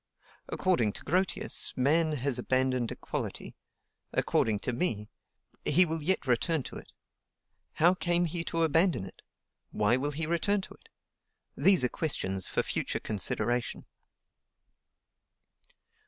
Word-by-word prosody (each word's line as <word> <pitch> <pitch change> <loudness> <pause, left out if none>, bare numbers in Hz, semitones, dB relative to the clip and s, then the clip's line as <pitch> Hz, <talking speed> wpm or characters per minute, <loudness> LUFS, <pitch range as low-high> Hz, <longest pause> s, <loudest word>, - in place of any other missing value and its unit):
According 145 - +1
to - - -8
Grotius, 185 -1 0
man 155 +5 +2
has 135 -2 -1
abandoned 130 -1 0
equality; - - -5 0.6
according 110 -2 +1
to 125 - -2
me, 110 - 0 0.5
he 185 - +5
will 160 -1 -3
yet 175 +1 0
return 135 +4 +1
to - - -8
it. - - -12 0.8
How 175 +3 +4
came 175 -1 +1
he 165 0 -2
to 165 -1 0
abandon 165 - +2
it? 95 - -13 0.5
Why 105 +3 +2
will 140 +3 -1
he 160 +3 -2
return 170 +5 +1
to - - -10
it? - - -23 0.7
These 185 +1 +4
are 125 - +2
questions 95 - 0
for - - 0
future - - -2
consideration. 110 +3 -1
145 Hz, 125 wpm, -29 LUFS, 120-170 Hz, 0.8 s, he